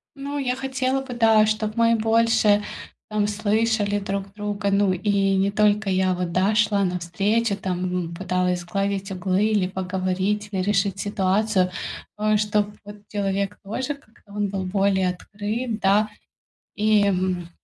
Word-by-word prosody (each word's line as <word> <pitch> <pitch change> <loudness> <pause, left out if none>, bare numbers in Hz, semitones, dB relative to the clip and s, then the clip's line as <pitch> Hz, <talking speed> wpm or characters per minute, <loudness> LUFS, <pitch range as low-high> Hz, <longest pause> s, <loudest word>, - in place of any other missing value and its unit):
Ну, 285 +1 -5
я 250 -2 0
хотела 265 0 -1
бы, 260 -2 -7
да, 225 -2 +5
чтобы 215 0 -1
мы 230 0 +4
больше 225 -2 +3 0.5
там 210 -1 0
слышали 210 0 +1
друг 195 0 -4
друга. 205 -1 -2
Ну, 200 -1 +3
и 195 +1 +1
не 195 +1 +2
только 210 0 +2
я, 185 0 +2
вот, 180 -1 -3
да, 190 +4 +2
шла 210 -2 +3
навстречу, 195 +5 0
там, 185 -2 -3 0.2
м, 170 - -8
пыталась 180 0 0
сгладить 195 +2 -2
углы, 185 +2 0
или 210 -4 +2
поговорить, 190 +2 -2
или 190 -2 -1
решить 195 0 0
ситуацию, 195 -1 +1 0.5
ну 215 0 +1
и - - +4
чтоб 210 0 +1 0.2
вот 205 0 -9
человек 200 0 -1
тоже 255 +8 -3
как-то 220 -6 -23
он 205 -1 -1
был 195 -1 -3
более 190 -1 +1
открыт, 210 +5 -4
да. 205 +2 +3 0.7
И, 215 -1 +3
м, 185 -3 0
205 Hz, 155 wpm, -23 LUFS, 190-215 Hz, 0.7 s, да